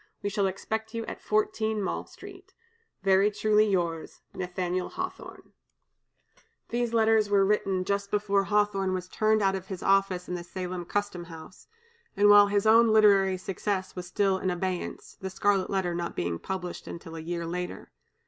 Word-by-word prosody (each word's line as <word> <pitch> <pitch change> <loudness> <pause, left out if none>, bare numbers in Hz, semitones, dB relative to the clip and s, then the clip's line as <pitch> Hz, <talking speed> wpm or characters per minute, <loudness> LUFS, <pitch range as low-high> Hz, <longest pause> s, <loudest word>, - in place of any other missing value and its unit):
We 205 - -1
shall 200 -1 +1
expect 220 +4 -4
you 230 0 -3
at - - -7
14 215 0 0
Mall 195 - -3
Street. 385 -1 -13 0.5
"Very 195 +1 +4
truly 210 +1 +2
yours, 170 -4 -2
"NATH^L 180 0 -3
HAWTHORNE." 370 0 -7 1.2
These 240 0 -1
letters 220 -2 +3
were 200 -1 +4
written 195 -2 +1
just 200 0 -1
before 200 -1 +1
Hawthorne 200 -2 +1
was 180 -1 -5
turned 215 +2 +1
out 195 0 +3
of 190 -1 -5
his 190 -3 -6
office 195 -2 +2
in - - -4
the 175 -1 -4
Salem 180 0 -5
custom 205 -2 -3
house, 165 +2 -12 0.5
and 205 +1 +6
while 205 0 +8
his 200 +1 0
own 230 +2 +6
literary 200 -3 +5
success 190 +1 -3
was 180 -1 -6
still 190 0 +1
in 185 - -1
abeyance, 180 0 -4
the 190 - -4
"Scarlet 195 0 +1
Letter" 190 -3 -1
not 170 0 -4
being 85 -1 -2
published 180 -2 -5
till 165 -1 -10
a - - -6
year 170 +1 -4
later. 180 +1 -5
195 Hz, 165 wpm, -28 LUFS, 180-210 Hz, 1.2 s, while